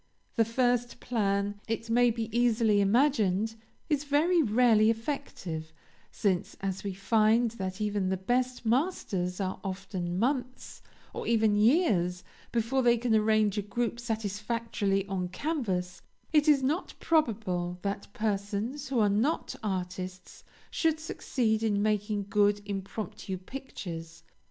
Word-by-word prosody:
The 225 - +4
first 245 +1 0
plan, 205 -3 -1
it 225 0 -3
may 240 +1 +4
be 225 -1 -2
easily 230 -3 +3
imagined, 220 -2 +2 0.3
is 295 -3 +1
very 310 +5 +3
rarely 220 -3 +4
effective; 225 - -3 0.4
since, 190 -4 -1
as 190 -1 -3
we 200 - -2
find 220 +4 +3
that 190 -3 -5
even 205 -3 0
the 190 - 0
best 245 +5 -1
masters 220 - 0
are 190 -1 -2
often 185 -2 -4
months, 255 +3 -2 0.3
or - - -5
even 220 -2 +3
years, 205 - +3 0.3
before 240 +3 +1
they 240 -1 +4
can 235 0 0
arrange 215 -1 +3
a - - 0
group 235 +3 -2
satisfactorily 215 -2 -1
on 190 -2 -2
canvas, 185 - -2 0.3
it 300 0 +4
is 285 -3 +5
not 305 +8 -1
probable 200 - 0
that 200 0 -3
persons 215 +7 -2
who 270 - -1
are 215 -2 +4
not 225 +11 0
artists 185 -2 -5 0.3
should 320 -1 +1
succeed 235 -8 -1
in 210 -3 +1
making 210 -1 0
good 205 0 +3
impromptu 200 0 -5
pictures. 175 -7 -8
215 Hz, 130 wpm, -29 LUFS, 195-245 Hz, 0.4 s, is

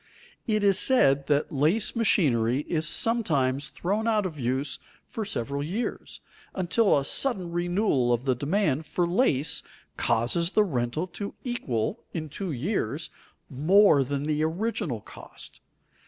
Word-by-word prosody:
It 215 -2 +1
is 195 -1 +4
said 140 - +4
that 145 0 +1
lace 155 - +1
machinery 135 - +2
is 155 0 -1
sometimes 145 - +2
thrown 205 +5 -2
out 215 -3 +2
of 160 -5 -5
use 130 +3 -1 0.3
for 225 - -5
several 140 - -3
years, 190 +11 -4 0.3
until 190 +1 +2
a 140 - -1
sudden 190 - -1
renewal 175 - +1
of 120 +2 0
the 130 - +2
demand 155 - -1
for 175 +3 0
lace 170 - +1 0.4
causes 120 +9 +1
the 215 - +4
rental 135 -2 -2
to 195 +3 -7
equal, 130 - -2 0.2
in 155 -2 -4
two 185 +4 -5
years, 150 - -2 0.4
more 155 +2 +4
than 140 +2 -3
the 155 0 0
original 165 - -2
cost. - - -12
155 Hz, 140 wpm, -26 LUFS, 135-200 Hz, 0.4 s, is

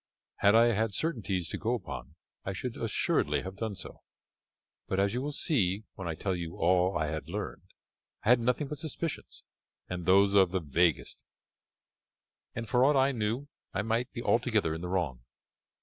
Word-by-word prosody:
"Had 100 +2 +5
I 115 +1 +6
had 110 -1 0
certainties 100 - -1
to - - -4
go 115 +3 0
upon 80 - -7 0.3
I 95 - -3
should 115 +6 -4
assuredly 115 -2 0
have 95 +1 -6
done 110 -1 -3
so, 95 - -9 0.9
but, 95 - 0
as 100 +1 +2
you 125 - -1
will 145 +2 -3
see 110 - 0
when 95 - -6
I 80 - -2
tell 95 +3 -1
you 85 -2 -5
all 90 +2 +3
I 80 - 0
had 80 +1 -4
learned, 105 +4 -4 0.6
I - - 0
had 125 0 +7
nothing 125 +5 0
but 150 0 -6
suspicions, 160 +1 -5 0.4
and 90 -1 -5
those 100 +1 +5
of 95 -3 +6
the 95 +1 0
vaguest, 80 +1 0 1.3
and 115 0 -4
for 125 +4 +3
aught 145 +2 +5
I 135 +1 +4
knew 115 +3 -2 0.3
I 95 - 0
might 115 +3 -1
be 120 - -6
altogether 110 -9 +2
in 80 - -5
the 90 - -4
wrong." 80 -10 -1
100 Hz, 180 wpm, -30 LUFS, 90-120 Hz, 1.3 s, had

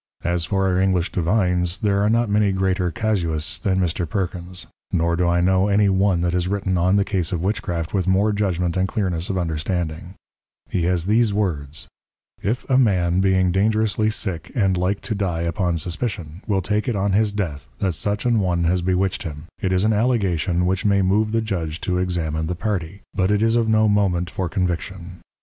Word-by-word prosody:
_ - - -14
As 85 -1 0
for 95 +3 0
our 90 -1 +2
English 95 -2 +1
Divines, 90 0 +1
there 100 -3 +1
are 105 - +2
not 115 +1 +2
many 105 -1 +2
greater 95 -1 0
Casuists 85 -8 -1
than 95 -1 0
Mr. 85 -2 -1
Perkins; 90 -2 -4 0.3
nor 85 -1 +1
do 90 +1 +1
I 85 0 +2
know 95 +2 +3
any 100 0 +3
one 95 -2 +2
that 85 0 0
has 90 0 0
written 95 -1 -1
on 90 +2 +2
the 100 -1 +2
Case 90 -7 -1
of 90 -2 -2
Witchcraft 90 -4 -2
with 95 -2 0
more 100 +3 +3
Judgment 90 -4 0
and 95 0 +1
Clearness 90 -5 -2
of 95 - -1
Understanding: 85 +1 -3 0.5
He 85 -3 -1
has 90 -1 0
these 110 0 +2
Words, 75 -8 -2 0.5
"If 115 +6 -2
a 130 -1 +3
Man 90 -7 +2
being 95 -1 +3
dangerously 110 +2 +1
sick 95 -6 -4
and 95 -6 +2
like 90 +3 -1
to 115 - -3
die 95 -5 -1
upon 85 0 0
suspicion, 90 -1 -3
will 95 -3 +1
take 105 +5 -1
it 120 - 0
on 100 0 0
his 105 +2 +2
death, 85 -10 -4
that 95 -3 0
such 105 +6 -2
an 120 -2 +3
one 90 -3 0
has 90 +2 +1
bewitched 95 +1 0
him, 75 -2 -6 0.2
it 95 - -1
is 95 +1 +2
an 110 +1 +3
allegation 95 -7 +1
which 95 +1 0
may 100 -2 +3
move 105 +3 +2
the 115 0 +1
Judge 85 -7 -3
to 90 -1 -1
examine 80 -3 -1
the 90 - -2
Party, 95 -2 -3
but 95 0 +1
it 105 +1 +2
is 115 0 +3
of 115 -2 +2
no 110 0 +4
moment 95 -4 +1
for 90 -2 -3
Conviction." 90 -1 -3
95 Hz, 205 wpm, -22 LUFS, 85-100 Hz, 0.5 s, no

